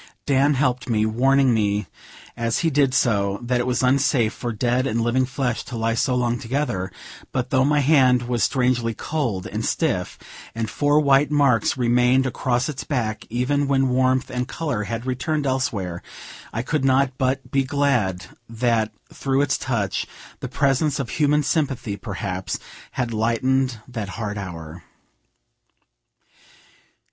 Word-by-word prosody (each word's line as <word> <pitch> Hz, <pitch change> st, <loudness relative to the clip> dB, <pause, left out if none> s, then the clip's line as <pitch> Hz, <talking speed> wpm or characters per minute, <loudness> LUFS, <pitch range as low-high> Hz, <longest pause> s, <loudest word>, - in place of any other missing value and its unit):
Dan 140 Hz, +1 st, +3 dB
helped 125 Hz, -2 st, 0 dB
me, 110 Hz, -2 st, +2 dB
warning 130 Hz, +3 st, +3 dB
me 105 Hz, -2 st, +1 dB, 0.5 s
as 115 Hz, 0 st, -1 dB
he 165 Hz, -, +2 dB
did 135 Hz, -2 st, +2 dB
so 100 Hz, -5 st, +2 dB
that 125 Hz, +1 st, 0 dB
it 125 Hz, -, -1 dB
was 125 Hz, 0 st, 0 dB
unsafe 130 Hz, -3 st, +2 dB
for 120 Hz, -, -4 dB
dead 120 Hz, +4 st, 0 dB
and 115 Hz, -2 st, -1 dB
living 125 Hz, +3 st, +1 dB
flesh 130 Hz, -3 st, -2 dB
to 120 Hz, -, -6 dB
lie 115 Hz, 0 st, 0 dB
so 125 Hz, +3 st, +1 dB
long 120 Hz, -1 st, 0 dB
together; 115 Hz, -7 st, -2 dB, 0.4 s
but 125 Hz, -1 st, -2 dB
though 130 Hz, -1 st, +4 dB
my 145 Hz, +1 st, +3 dB
hand 130 Hz, -4 st, +4 dB
was 120 Hz, -3 st, -1 dB
strangely 125 Hz, -3 st, +1 dB
cold 120 Hz, -13 st, -2 dB
and -, -, -4 dB
stiff, -, -, -1 dB, 0.4 s
and 115 Hz, -2 st, -3 dB
four 145 Hz, +1 st, +3 dB
white 140 Hz, -1 st, +4 dB
marks 140 Hz, -6 st, +2 dB
remained 125 Hz, +2 st, +3 dB
across 125 Hz, -1 st, 0 dB
its 145 Hz, -4 st, -5 dB
back, 115 Hz, -6 st, -3 dB
even 135 Hz, +5 st, 0 dB
when 135 Hz, -1 st, +2 dB
warmth 130 Hz, 0 st, +1 dB
and 125 Hz, 0 st, -2 dB
color 145 Hz, -11 st, -3 dB
had 115 Hz, +4 st, -4 dB
returned 140 Hz, +4 st, -1 dB
elsewhere, 125 Hz, -10 st, -1 dB, 0.5 s
I 115 Hz, -, -3 dB
could 155 Hz, +1 st, -1 dB
not 135 Hz, 0 st, +3 dB
but 130 Hz, +1 st, -1 dB
be 135 Hz, 0 st, +2 dB
glad 125 Hz, -10 st, 0 dB, 0.2 s
that, 115 Hz, -1 st, 0 dB, 0.2 s
through 135 Hz, 0 st, 0 dB
its 145 Hz, -, +1 dB
touch, 115 Hz, -7 st, -2 dB, 0.3 s
the -, -, -5 dB
presence 140 Hz, +1 st, +1 dB
of 135 Hz, -4 st, -4 dB
human 150 Hz, -1 st, +2 dB
sympathy, 135 Hz, -9 st, -1 dB
perhaps, 95 Hz, -2 st, -4 dB, 0.4 s
had 120 Hz, -3 st, -2 dB
lightened 120 Hz, +3 st, +1 dB
that 110 Hz, -5 st, -5 dB
hard 105 Hz, -1 st, -4 dB
hour. 85 Hz, -3 st, -8 dB
125 Hz, 155 wpm, -22 LUFS, 115-135 Hz, 0.5 s, though